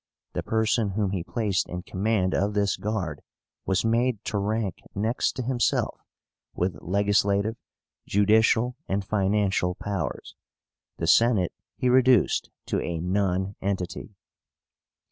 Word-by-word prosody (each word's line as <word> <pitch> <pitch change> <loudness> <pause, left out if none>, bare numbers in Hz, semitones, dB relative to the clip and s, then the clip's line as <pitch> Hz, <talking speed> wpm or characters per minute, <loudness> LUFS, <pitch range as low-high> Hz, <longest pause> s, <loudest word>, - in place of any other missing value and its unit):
The - - -1
person 110 -2 +1
whom 100 -1 0
he 95 -4 -2
placed 105 -2 -1
in 90 0 -5
command 95 -1 0
of 100 +2 0
this 100 -1 +2
guard 95 -8 -3 0.5
was 95 +2 +1
made 115 -1 +1
to 105 - -1
rank 105 -1 -1 0.2
next 110 +5 0
to 130 - -4
himself, 120 0 0 0.6
with 90 -4 -2
legislative, 100 +2 +1 0.5
judicial, 110 +4 +3
and 95 +1 -1
financial 100 -3 +1
powers. 100 -2 -4 0.6
The 80 - -2
Senate 105 0 +4 0.2
he 125 - -1
reduced 125 -3 +4 0.2
to - - -1
a 85 -1 -3
nonentity. 95 +1 -2
100 Hz, 120 wpm, -26 LUFS, 95-110 Hz, 0.6 s, Senate